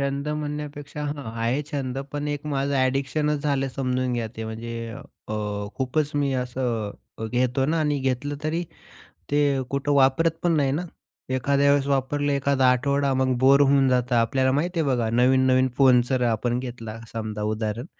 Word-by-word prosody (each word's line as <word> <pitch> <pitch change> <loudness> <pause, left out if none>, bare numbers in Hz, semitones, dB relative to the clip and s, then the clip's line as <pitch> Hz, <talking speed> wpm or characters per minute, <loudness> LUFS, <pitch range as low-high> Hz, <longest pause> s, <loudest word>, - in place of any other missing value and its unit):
छंद 140 +1 -2
म्हणण्यापेक्षा 150 -1 -5
हां. 145 -2 -4 0.2
आहे 125 +6 0
छंद. 135 -2 -2
पण 145 0 -3
एक 145 0 -4
माझं 140 -1 -1
ॲडिक्शनच 140 +3 0
झालं, 140 -2 0
समजून 130 -1 0
घ्या 120 -2 -1
ते. 110 - -4
म्हणजे 115 +1 -5 0.4
अ, - - -3 0.4
खूपच 140 +3 0
मी 140 -2 +1
असं 125 -4 -2 0.4
घेतो 125 +2 +1
ना 160 +1 +1
आणि 145 -2 +1
घेतलं 135 +2 -1
तरी 160 +3 -1 0.7
ते 145 0 +3 0.3
कुठं 140 +1 0
वापरत 140 +4 +4
पण 175 -1 +2
नाही 140 -2 +2
ना. 155 +5 -1 0.5
एखाद्या 140 +2 +2
वेळेस 140 -1 +2
वापरलं, 140 +1 0
एखादा 140 -1 +2
आठवडा, 140 +2 +1
मग 130 -1 +1
बोर 135 +2 +5
होऊन 135 -1 +4
जातं 125 -1 +1
आपल्याला, 130 +3 +2
माहिती 170 +4 0
आहे 155 - 0
बघा. 120 -4 +1
नवीन-नवीन 130 +1 +3
फोन 130 -3 +6
जर 130 -2 +1
आपण 120 +1 0
घेतला, 115 -3 -6
समजा 110 -2 -4
उदाहरण. 110 +3 -2
135 Hz, 165 wpm, -24 LUFS, 125-145 Hz, 0.7 s, फोन